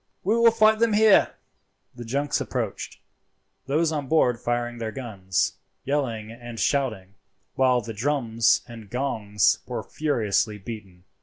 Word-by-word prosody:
We 210 +5 +2
will 235 0 +6
fight 220 -1 +4
them 230 -1 +3
here." 215 -1 +5 0.6
The 120 - -9
junks 140 +5 -1
approached, - - -4 0.7
those 155 +4 +1
on 145 -3 -3
board 125 -6 +2
firing 120 0 -2
their 110 -1 -3
guns, 100 -8 -2 0.3
yelling 120 -6 -2
and 120 0 -9
shouting, 110 -7 -1 0.4
while 130 -2 +3
the 115 0 -7
drums 115 -1 +1
and 115 -3 -11
gongs 110 -6 +1
were - - -4
furiously 110 -7 0
beaten. 95 -4 -9
120 Hz, 135 wpm, -25 LUFS, 110-145 Hz, 0.7 s, will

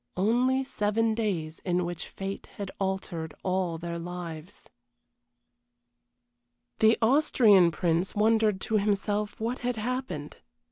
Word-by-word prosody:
Only 250 +7 +2
seven 225 -2 0
days 180 -8 -2
in 180 -1 0
which 175 -1 -5
fate 195 0 -6
had 200 -2 -5
altered 180 -5 -3
all 185 -3 0
their 170 0 -5
lives. 175 +1 -7 2.1
The 220 +1 +5
Austrian 225 - +5
Prince 170 +2 0
wondered 215 -1 +3
to 220 - +1
himself 205 +1 -1
what 235 +3 -2
had 245 0 -1
happened. 225 - -4
200 Hz, 110 wpm, -28 LUFS, 175-225 Hz, 2.1 s, The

